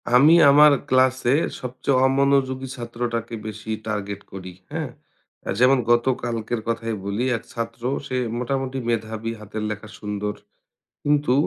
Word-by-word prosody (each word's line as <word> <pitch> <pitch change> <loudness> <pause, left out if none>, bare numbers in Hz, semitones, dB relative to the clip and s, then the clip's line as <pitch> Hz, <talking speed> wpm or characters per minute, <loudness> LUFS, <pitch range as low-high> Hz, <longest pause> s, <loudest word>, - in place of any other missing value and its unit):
আমি 145 +6 +7 0.2
আমার 150 +1 +8 0.2
ক্লাসে 130 -1 +3 0.3
সবচেয়ে 130 +1 -1
অমনোযোগী 135 -1 +2
ছাত্রটাকে 120 -1 -4
বেশি 110 0 -8 0.2
টার্গেট 100 -1 -3
করি। 95 -1 -8 0.2
হ্যাঁ? - - -3 0.6
আ - - -4
যেমন 130 +2 +6
গত 120 0 +4 0.2
কালকের 115 -1 -2
কথাই 115 -1 -1
বলি 100 +5 -1
এক 115 - -12
ছাত্র 115 0 -5 0.3
সে 130 - -2 0.2
মোটামুটি 135 +1 -2
মেধাবী 110 0 -2
হাতের 105 +1 -6
লেখা 105 0 -6
সুন্দর। 105 0 -3 0.7
কিন্তু 145 -3 +2
120 Hz, 130 wpm, -23 LUFS, 110-130 Hz, 0.7 s, আমার